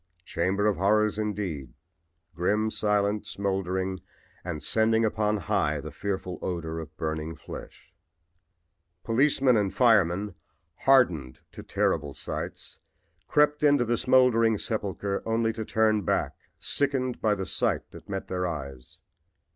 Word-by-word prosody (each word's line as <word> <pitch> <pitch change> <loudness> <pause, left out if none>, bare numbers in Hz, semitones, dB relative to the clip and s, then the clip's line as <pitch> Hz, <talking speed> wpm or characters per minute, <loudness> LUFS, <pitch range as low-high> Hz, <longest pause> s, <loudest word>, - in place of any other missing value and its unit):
Chamber 95 +4 0
of 105 -2 +2
horrors 105 +3 +2
indeed 95 - -3 0.6
grim, 105 +5 0
silent, 105 -1 0
smoldering 95 -1 -2 0.4
and 85 -4 -5
sending 110 0 +2
upon 105 0 +1
high 100 - 0
the - - -7
fearful 95 -2 -4
odor 80 -2 -3
of 80 -1 -10
burning 80 0 -3
flesh. - - -11 1.1
Policemen 130 +1 +3
and 100 -2 +1
firemen, 105 -5 +3 0.5
hardened 90 - +3
to - - -9
terrible 75 -4 -1
sights, - - -6 0.5
crept 150 0 +3
into 145 -4 +4
the 120 +1 +1
smoldering 115 -3 +4
sepulchre 100 -2 -2
only 115 0 0
to 110 - -4
turn 110 -1 +2
back 90 - 0 0.2
sickened 135 -3 -1
by 105 -2 +2
the 95 -1 -4
sight - - -1
that - - -13
met 95 -1 -4
their 90 -1 -1
eyes. 70 -6 -7
105 Hz, 125 wpm, -27 LUFS, 90-115 Hz, 1.1 s, into